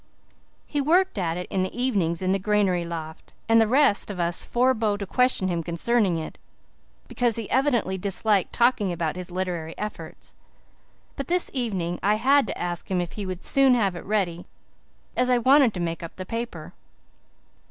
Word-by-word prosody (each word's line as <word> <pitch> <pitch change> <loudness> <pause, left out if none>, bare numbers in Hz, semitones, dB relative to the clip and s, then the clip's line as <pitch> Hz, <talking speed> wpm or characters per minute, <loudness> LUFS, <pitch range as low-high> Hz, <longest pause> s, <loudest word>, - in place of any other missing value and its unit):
He 290 - -1
worked 345 - +2
at 170 -2 -1
it 180 - -4
in 190 - 0
the 185 +6 -4
evenings 190 -9 0
in 185 - +1
the 195 - +1
granary 195 -3 +1
loft, 160 -2 -8
and 225 0 +5
the 220 - +3
rest 255 -4 +3
of 195 -3 -6
us 170 0 0
forebore 235 -4 +1
to 200 - -5
question 250 -2 +2
him 170 -2 -1
concerning 180 +3 +1
it, 160 - -7 0.7
because 240 -3 0
he 225 -3 -4
evidently 245 -8 +1
disliked 200 +1 0
talking 235 -5 +2
about 165 -2 -2
his 180 0 -7
literary 175 -3 -4
efforts. 180 -6 -7 0.8
But 275 - -5
this 360 0 +2
evening 190 -10 -2
I 205 +1 +2
had 275 +3 +3
to - - -4
ask 175 -1 -4
him 185 -2 0
if 175 -1 -3
he 205 -2 -6
would 185 0 -6
soon 270 -2 +5
have 200 -6 +1
it 175 - -7
ready, 185 -5 -2 0.7
as 250 0 +1
I 250 - +4
wanted 260 +1 +5
to - - -4
make 165 -1 -3
up 165 - -8
the 185 - -7
paper. 230 +4 -6
200 Hz, 185 wpm, -25 LUFS, 175-240 Hz, 0.8 s, and